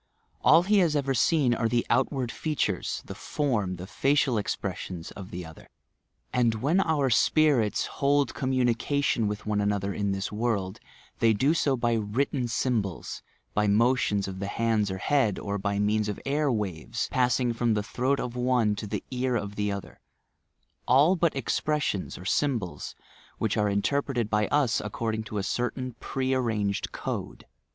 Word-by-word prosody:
All 170 - +7
he 205 +2 +3
has 165 -5 +3
ever 140 -2 +1
seeu 135 0 +3
are 115 0 0
the 120 0 +1
outward 130 -4 +1
features, 130 - -2
the - - -7
form, 110 -11 -1
the 90 +1 -7
facial 130 +3 +1
expressions 95 -4 -4
of 95 -2 -9
the 90 0 -6
other; 80 0 -13 0.6
and 120 -2 +2
when 145 - +2
our 150 -7 +1
spirits 130 -3 +3
hold 140 0 +1
commiinieatioD 130 -1 +1
with 105 0 -4
one 105 -1 0
another 100 -1 0
in 100 0 -1
this 95 0 -3
world, 105 -4 -1 0.4
they 115 -1 +4
do 135 +9 +2
so 145 -5 +1
by 120 -1 +1
written 120 +4 -1
symbols, 110 -6 -2 0.3
by 105 0 +2
motions 105 -2 +2
of 95 -1 -6
the 100 - -3
hands 110 -1 +1
or 95 - -3
head, 115 0 +1
or 100 0 -3
by 100 +1 -1
means 105 +1 +1
of 105 - -4
air 145 +1 +1
waves, 105 0 -2
passing 125 -1 +2
from 115 -1 +1
the 105 - 0
throat 130 +4 0
of 125 -1 -4
one 125 -3 +2
to 105 - -5
the 105 0 -3
ear 125 0 0
of 100 -2 -3
the 105 -1 -1
other 100 -1 -7 0.4
— - - -46
all 145 +9 +5
but 170 -4 +1
expressions 140 -4 -1
or 90 - -10
symbols, 115 -5 -1 0.4
which 110 -2 0
are 105 -1 +2
interpreted 120 +2 0
by 105 -1 +2
us 135 -7 +2
according 110 +1 -2
to 110 -1 -6
a 100 - -1
certain 125 +3 -2
pre 130 0 -1
arranged 110 -6 -1
code. - - -5
115 Hz, 170 wpm, -27 LUFS, 105-135 Hz, 0.6 s, All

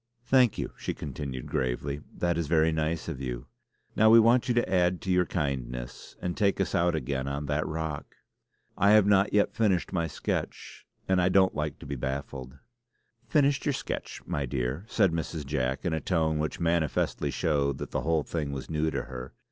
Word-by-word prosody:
"Thank 125 -4 +4
you," - - -3
she - - -4
continued 70 -3 -5
gravely, 70 +3 -2 0.2
"that 85 -1 +1
is 85 -2 -1
very 80 +1 +3
nice 80 +1 -1
of 65 - -5
you. - - -4 0.5
Now 110 +1 +5
we 115 +1 +9
want 115 +2 +4
you 120 - +1
to 120 - +2
add 90 -1 +2
to 95 - -2
your 90 -1 +3
kindness 65 -6 -4
and 90 -1 -3
take 100 -2 +1
us 95 - 0
out 85 0 +2
again 65 -2 -2
on 70 +1 -3
that 75 +2 -1
rock. 80 -2 -4 0.6
I 100 +1 +4
have 110 -2 +6
not 100 0 +4
yet 105 0 +2
finished 100 -5 +1
my 85 -3 0
sketch, 75 - -4 0.2
and 95 -1 +3
I 90 - +3
don't 95 0 +4
like 75 -1 -3
to - - -12
be 70 - -4
baffled." 65 0 -5 0.7
"Finished 140 -2 +2
your 145 - +2
sketch, 140 - -5
my 70 -2 -2
dear," 65 - -2
said 100 -6 +3
Mrs. 80 -2 -3
Jack, 65 +1 -2
in 85 - 0
a 80 - 0
tone 80 -4 +1
which 75 0 -2
manifestly 85 -3 0
showed 70 -3 0
that - - -6
the - - -1
whole 80 -1 +1
thing 75 -3 -3
was 70 +1 -6
new 80 0 +1
to - - -2
her. 65 0 -8
80 Hz, 195 wpm, -28 LUFS, 70-90 Hz, 0.7 s, we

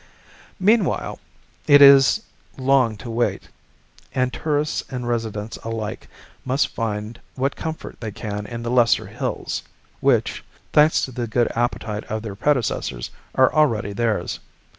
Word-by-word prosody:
Meanwhile 205 0 +2 0.5
it 145 0 +8
is 140 +9 +7 0.3
long 130 -4 +2
to 115 - -9
wait, 120 +1 -1 0.7
and 125 -1 +1
tourists 150 -1 -1
and 125 -2 -4
residents 110 -2 -3
alike 115 -2 -5 0.4
must 130 +2 +1
find 110 0 -4
what 135 +1 -1
comfort 160 0 -6
they 110 - -3
can 105 0 -5
in 115 -1 -6
the 120 - -2
lesser 120 -2 +3
hills - - -4 0.4
which, - - +1 0.3
thanks 150 +1 +5
to 130 - -10
the 120 -1 -3
good 120 +2 +1
appetite 115 -2 -2
of 110 0 -4
their 105 -3 -5
predecessors, 110 - -1 0.2
are 130 - +4
already 115 -10 +2
theirs. 115 0 -1
120 Hz, 135 wpm, -22 LUFS, 110-135 Hz, 0.7 s, it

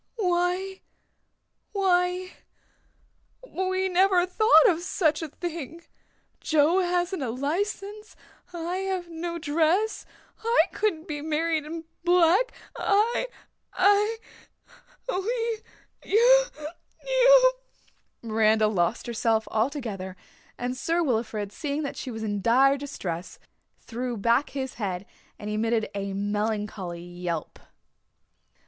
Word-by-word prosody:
"Why 365 0 0 0.9
why 365 -2 +1 1.2
we 375 -2 -1
never 370 0 +3
thought 365 -3 +5
of 340 -2 +2
such 320 -3 +1
a 320 - -3
thing 335 +1 -6 0.6
Joe 315 +3 +3
hasn't 355 -1 0
a 260 - -2
license 400 - -3 0.4
I 345 +1 -3
have 375 -2 -3
no 340 +1 -4
dress 335 +7 +1 0.4
I 465 +2 +4
couldn't 345 -7 -1
be 295 -2 -4
married 315 0 0
in 325 +1 -6 0.2
black 360 +6 +4 0.2
I 435 +5 +1 0.5
I 410 +4 +3 0.9
we 460 +2 -1 0.4
you - - +5 0.6
you - - +6 0.3
" - - -39
Miranda 220 -1 +3
lost 190 0 0
herself 225 -2 0
altogether 220 -6 -2 0.4
and 245 +1 -3
Sir 335 +6 0
Wilfrid, 220 -6 -1
seeing 290 +6 -3
that 280 - -4
she - - -6
was 225 -2 -5
in 205 -2 -2
dire 265 +6 +5
distress 195 - -6 0.4
threw 245 0 -5
back 235 +7 +2
his 265 -2 -4
head 190 -1 -3 0.3
and 210 - -8
emitted 220 +1 0
a 200 -1 -3
melancholy 205 -3 -3
yelp. 175 -2 -5
320 Hz, 110 wpm, -26 LUFS, 225-375 Hz, 1.2 s, you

